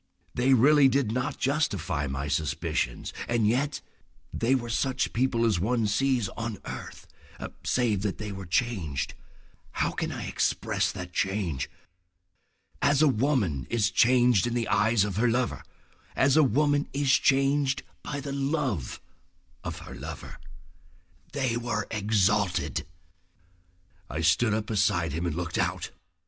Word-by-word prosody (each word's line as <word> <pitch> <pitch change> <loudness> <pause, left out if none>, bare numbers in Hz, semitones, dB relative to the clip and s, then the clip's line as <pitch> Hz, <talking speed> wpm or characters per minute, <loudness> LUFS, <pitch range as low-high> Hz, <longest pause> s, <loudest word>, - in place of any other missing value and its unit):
They 130 +2 +3
really 140 +3 +6
did 135 -4 +1
not 125 +4 -2
justify 100 - 0
my 70 +1 -3
suspicions, 70 -4 -2
and 120 -3 +2
yet—! 140 +6 0 0.5
They 120 +3 +2
were 120 -3 -3
such 130 +2 0
people 120 -1 +1
as 105 -7 +2
one 115 +4 +1
sees 120 +1 +1
on 115 -2 -5
earth—save 115 -6 -4
that 100 -1 -2
they 105 -1 -5
were 95 -2 -7
changed. 90 - -1 0.6
How - - 0
can - - -3
I - - -5
express - - 0
that 90 -1 -8
change? 95 -8 -1 1.1
As 145 +1 +4
a - - +6
woman 115 - +1
is 110 -3 +1
changed 120 -3 +4
in 120 - -2
the 120 -2 0
eyes 110 -1 +3
of 100 -2 -3
her 120 +2 +3
lover, 125 +1 0 0.5
as 130 0 +3
a 155 - +7
woman 145 +2 +2
is 140 -1 +1
changed 135 +1 +2 0.2
by 145 - -4
the 140 0 -5
love 135 - -1 0.6
of - - -6
a - - -8
lover. - - -8 0.9
They 130 -4 0
were 120 -3 -2
exalted.... 105 -3 +1 1.2
I 75 - -3
stood 95 +8 +3
up 110 -1 -2
beside 95 -6 +1
him 85 +3 -2
and 80 - -2
looked 85 -1 -3
out. - - -1
115 Hz, 140 wpm, -27 LUFS, 95-135 Hz, 1.2 s, a